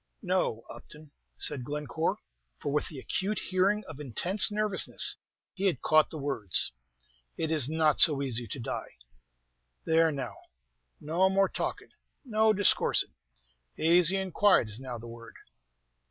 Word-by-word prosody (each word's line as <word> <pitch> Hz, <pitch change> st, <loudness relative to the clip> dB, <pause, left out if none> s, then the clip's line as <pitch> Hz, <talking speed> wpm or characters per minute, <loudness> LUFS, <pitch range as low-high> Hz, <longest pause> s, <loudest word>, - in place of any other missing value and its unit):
"No, 180 Hz, -, -1 dB
Upton," 150 Hz, +5 st, -13 dB, 0.3 s
said 140 Hz, -4 st, -1 dB
Glencore; 150 Hz, +3 st, -3 dB, 0.4 s
for, 145 Hz, -, -4 dB
with 150 Hz, -, 0 dB
the 150 Hz, -, -9 dB
acute 195 Hz, +10 st, -3 dB
hearing 195 Hz, +3 st, 0 dB
of 155 Hz, -3 st, -10 dB
intense 175 Hz, -, +1 dB
nervousness, 210 Hz, -2 st, +1 dB, 0.4 s
he 195 Hz, +1 st, -1 dB
had 165 Hz, -10 st, -1 dB
caught 155 Hz, 0 st, +4 dB
the 160 Hz, -, -7 dB
words. 135 Hz, -, 0 dB, 0.7 s
"It 160 Hz, -1 st, -2 dB
is 150 Hz, -4 st, +3 dB
not 155 Hz, -1 st, +2 dB
so 140 Hz, -3 st, +6 dB
easy 120 Hz, -3 st, -2 dB
to 130 Hz, -, -6 dB
die." 115 Hz, -, -6 dB, 0.9 s
"There, 165 Hz, 0 st, +3 dB
now, 135 Hz, -6 st, -5 dB, 0.7 s
no 175 Hz, +5 st, +1 dB
more 195 Hz, 0 st, +2 dB
talkin', -, -, -5 dB, 0.3 s
no 220 Hz, -2 st, +2 dB
discoorsin' 205 Hz, -2 st, +2 dB, 0.6 s
azy 175 Hz, +3 st, +4 dB
and 190 Hz, -2 st, -5 dB
quiet 200 Hz, -, +4 dB
is 105 Hz, +3 st, -3 dB
now 130 Hz, -2 st, -6 dB
the 115 Hz, +1 st, -10 dB
word." 115 Hz, -1 st, -12 dB
155 Hz, 140 wpm, -29 LUFS, 135-190 Hz, 0.9 s, so